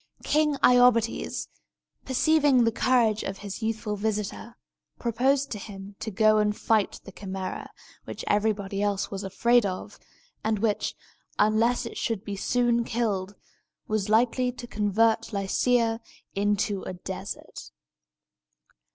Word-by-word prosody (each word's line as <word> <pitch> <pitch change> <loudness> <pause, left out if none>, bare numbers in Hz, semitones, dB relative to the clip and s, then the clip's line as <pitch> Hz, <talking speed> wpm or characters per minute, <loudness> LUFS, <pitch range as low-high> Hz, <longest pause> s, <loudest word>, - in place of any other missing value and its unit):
King 300 -1 +2
Iobates, 245 -2 +3 0.6
perceiving 280 -1 +4
the 230 - +3
courage 230 -2 +2
of 195 - -4
his 200 +3 -6
youthful 220 -1 -2
visitor, 215 +2 -3 0.4
proposed 265 +4 +1
to 210 - -4
him 200 -1 -9
to 220 - -4
go 215 +1 +4
and 210 0 +1
fight 220 -3 +1
the 195 - -10
Chimæra, 190 -1 -5 0.4
which - - -7
everybody 205 -1 0
else 205 -1 -1
was 195 0 -4
afraid 235 +5 +3
of, 185 -2 -5 0.4
and 220 0 +1
which, 210 0 -1 0.4
unless 225 +4 +2
it 230 - -7
should 220 -4 -2
be 205 -2 -5
soon 240 +3 +1
killed, 205 -5 -2 0.5
was 215 -1 -1
likely 245 +3 +3
to 245 0 -9
convert 225 +1 +1
Lycia 225 +3 +1 0.3
into 205 0 0
a - - -6
desert. 190 +2 -7
220 Hz, 125 wpm, -26 LUFS, 200-235 Hz, 0.6 s, perceiving